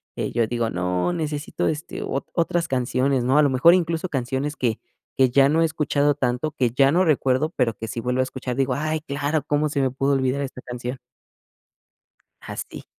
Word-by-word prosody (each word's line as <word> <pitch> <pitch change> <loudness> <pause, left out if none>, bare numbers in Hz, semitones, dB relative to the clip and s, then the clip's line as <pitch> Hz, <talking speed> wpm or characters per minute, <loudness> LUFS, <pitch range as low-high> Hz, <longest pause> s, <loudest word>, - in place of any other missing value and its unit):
eh, - - -3
yo 115 -1 +1
digo: 120 -2 -1
"No, 90 - -1
necesito, 155 -3 -2
este, 155 +1 -4
o 135 - -2
otras 170 0 0
canciones, 130 0 0
¿no?". 130 +4 +2
A - - +7
lo 145 - +4
mejor 135 +7 +6
incluso 170 0 0
canciones 135 +1 -2
que 115 -4 -1 0.4
que 130 -2 +5
ya 135 +2 +5
no 160 +3 +2
he - - +5
escuchado 145 -2 +1
tanto, 135 +2 -1
que 125 -6 0
ya 135 +2 +4
no 180 +2 +3
recuerdo, 140 0 +2
pero, 120 -4 +1
que 115 - -6
si 115 +2 -4
vuelvo 125 +2 -1
a - - +4
escuchar, 130 -1 -5
digo: 135 -1 +1
"Ay, 155 +3 -1
claro, 145 0 -2
¿cómo 150 +1 +1
se 140 - -2
me 135 - +2
pudo 135 +2 0
olvidar 135 +1 0
esta 135 -2 -5
canción?". 125 +1 -6 1.4
Así. - - -7
135 Hz, 200 wpm, -23 LUFS, 125-150 Hz, 1.4 s, A